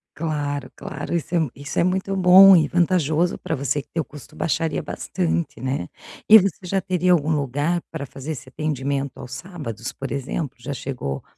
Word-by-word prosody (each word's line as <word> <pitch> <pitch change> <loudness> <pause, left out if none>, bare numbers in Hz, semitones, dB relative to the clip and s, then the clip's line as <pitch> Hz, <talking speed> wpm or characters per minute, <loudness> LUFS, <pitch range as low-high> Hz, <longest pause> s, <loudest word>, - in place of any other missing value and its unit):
Claro, 145 -3 -3
claro, - - -5
isso 170 +1 -3
é 175 - +4
um 155 -5 0
isso 145 +1 -4
é - - +4
muito 190 +2 0
bom 190 +1 +9
e 160 -4 +4
vantajoso 175 -1 +2
para 160 - -2
você 140 +1 -1
que - - -24
teu 165 -2 -2
custo 145 -2 -13
baixaria 165 -1 -1
bastante, 85 +2 -2
né, 130 -8 -3 0.4
e 220 - +12
você 195 -4 +1
já 195 +2 +1
teria 185 -1 +1
algum 160 -2 +1
lugar 145 +5 0
para 155 -3 -5
fazer 135 +4 -6
esse 130 - -10
atendimento 140 -1 -3
aos 125 - -9
sábados 135 - -6
por 135 -1 -7
exemplo, 140 +1 -3
já 140 - -6
chegou 125 - -4
150 Hz, 185 wpm, -22 LUFS, 135-175 Hz, 0.4 s, e